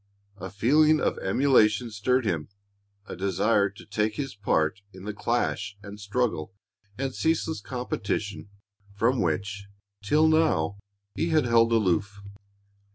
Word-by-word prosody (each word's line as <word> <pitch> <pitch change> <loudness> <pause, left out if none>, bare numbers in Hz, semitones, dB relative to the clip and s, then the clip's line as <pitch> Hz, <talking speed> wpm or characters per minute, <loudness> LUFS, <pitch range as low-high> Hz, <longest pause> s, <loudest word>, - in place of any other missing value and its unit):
A 95 +1 -7
feeling 150 +9 +3
of - - -1
emulation 110 0 +3
stirred 125 +4 0
him, 80 -7 -2 0.6
a - - -7
desire 100 +2 +1
to 100 +3 -15
take 105 0 -1
his 135 -2 -4
part 95 -3 0
in 95 -1 -12
the 105 +1 -4
clash 100 -1 -2
and 100 +1 -9
struggle 100 -5 -2 0.4
and 135 0 -3
ceaseless 160 +1 -1
competition 105 -5 -4 0.5
from 120 +5 +1
which, 100 +4 -2 0.4
till 150 +10 +3
now, 100 - +2 0.3
he 165 - -1
had 155 -4 +3
held 115 -1 +4
aloof. 105 -1 +1
105 Hz, 130 wpm, -26 LUFS, 100-130 Hz, 0.6 s, held